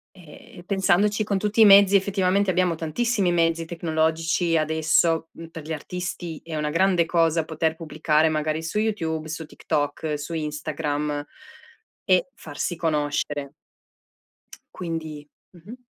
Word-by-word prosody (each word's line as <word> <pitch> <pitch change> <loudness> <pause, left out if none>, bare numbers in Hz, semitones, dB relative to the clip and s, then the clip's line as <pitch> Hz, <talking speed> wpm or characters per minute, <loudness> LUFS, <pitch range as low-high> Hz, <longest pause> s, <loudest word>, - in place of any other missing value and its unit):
Ehm, 170 -1 -15
e - - -16
pensandoci 200 +3 +2
con 200 -2 0
tutti 210 +2 0
i - - +10
mezzi, 200 0 +7
effettivamente 195 0 +1
abbiamo 180 -1 +1
tantissimi 190 +4 0
mezzi 165 -1 +1
tecnologici 165 0 0
adesso, 160 +1 +2
m 165 - -10
per 165 -2 -10
gli 160 - -5
artisti, 175 0 -5
è 160 -2 -6
una 150 0 -1
grande 175 +1 +3
cosa 165 -1 +2
poter 160 0 -1
pubblicare 155 -1 +1
magari 155 +1 -1
su 165 +6 -3
YouTube, 160 -8 -2
su 160 0 -5
TikTok, 150 0 -2
su 150 +3 -6
Instagram 150 -1 -3 0.8
e 185 +5 +3
farsi 160 +3 -5
conoscere. 145 -3 -2 1.2
Quindi 160 -4 -6 0.2
mh-mh. 195 +9 -12
165 Hz, 130 wpm, -24 LUFS, 155-185 Hz, 1.2 s, i